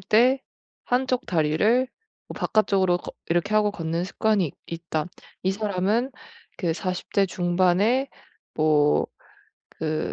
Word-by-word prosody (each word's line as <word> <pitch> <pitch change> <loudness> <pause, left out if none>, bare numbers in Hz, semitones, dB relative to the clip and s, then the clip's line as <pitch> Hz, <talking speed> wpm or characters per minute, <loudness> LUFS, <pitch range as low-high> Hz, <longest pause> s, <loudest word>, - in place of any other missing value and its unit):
때 255 +5 +4 0.5
한쪽 255 0 0
다리를 180 +10 +2 0.4
뭐 - - -7
바깥쪽으로 195 -4 +2
걷 - - -9
이렇게 175 +5 +1
하고 210 -1 +4
걷는 165 -2 -2
습관이 205 -1 +1
있 145 - -9
있다. 165 -2 -3 0.4
이 190 - +1
사람은 210 +4 0 0.5
그 170 -3 0
40 180 +2 -4
대 195 -1 +3
중반에 185 +9 +2 0.5
뭐 150 -1 +3 0.7
그 155 0 -1
185 Hz, 220 characters per minute, -25 LUFS, 165-215 Hz, 0.7 s, 때